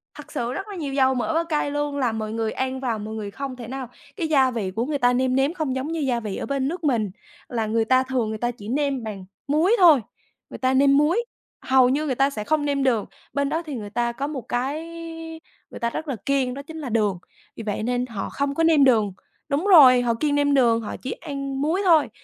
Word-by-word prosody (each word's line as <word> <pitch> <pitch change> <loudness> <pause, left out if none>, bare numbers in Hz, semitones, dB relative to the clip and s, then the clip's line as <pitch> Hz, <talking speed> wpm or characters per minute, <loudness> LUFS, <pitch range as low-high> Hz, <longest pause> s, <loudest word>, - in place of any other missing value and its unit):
Thật 295 - -11
sự 240 +1 -2
rất 390 +2 -5
là 405 - -7
nhiều 285 -5 -4
dầu 265 -1 +3
mỡ 260 +6 -1
và 330 +1 +2
cay 300 -3 -1
luôn, 290 -1 -2
là 250 -4 +1
mọi 215 -1 -4
người 225 -1 -1
ăn 260 0 -2
vào 235 -5 -2
mọi 215 +1 -6
người 205 -2 -5
không 265 +2 -5
thể 235 -3 -9
nào 260 -1 -6 0.3
cái 335 -6 -2
gia 265 -4 +3
vị 205 -6 -3
của 230 +5 -2
người 295 0 -1
ta 245 -1 +3
nêm 255 0 +1
nếm 275 +5 +2
không 305 -7 -2
giống 260 +3 -2
như 330 - -2
gia 255 -5 0
vị 210 -4 -5
ở - - -4
bên 275 -1 -1
nước 345 +2 -4
mình 230 -9 +1 0.4
là 225 -3 -2
người 225 +1 +1
ta 255 +2 +4
thường 255 -4 -1
người 220 - -3
ta 240 +2 -1
chỉ 210 -3 -12
nêm 275 -1 -1
bằng 200 -4 -6 0.2
muối 320 +9 +3
thôi, 315 -9 +7 0.5
người - - -8
ta 260 0 +1
nêm 275 +1 +5
muối, 345 +11 +2 0.4
hầu 260 -1 +4
như 290 +4 0
người 265 -4 -1
ta 275 +2 +3
sẽ 215 -6 -5
không 300 +3 0
nêm 280 -1 0
đường, 235 -6 +2 0.3
bên 280 0 0
đó 320 - -1
thì 290 -4 -5
người 210 -3 -6
ta 235 +3 -1
có 275 +4 -4
một 290 -4 -4
cái 265 +7 -2 0.9
người - - -8
ta 235 - 0
rất 315 +6 -5
là 270 - -2
kiêng 270 -3 +1
đó 280 - -6
chính 320 +3 -10
là 275 - -5
đường, 210 -4 +1 0.4
vì 225 - -7
vậy 210 0 -3
nên 245 +1 0
họ 225 -6 -5
không 280 0 -2
có 325 - +1
nêm 320 -3 +5
đường. 220 -7 +3 0.4
Đúng 295 +7 0
rồi, 265 -10 +8
họ 235 -1 +1
kiêng 290 +4 0
nêm 285 0 +2
đường, 235 -4 +4
họ 210 - -5
chỉ 265 - -4
ăn 275 -1 -5
muối 325 +7 +1
thôi 320 -5 +5
265 Hz, 260 wpm, -23 LUFS, 235-290 Hz, 0.9 s, rồi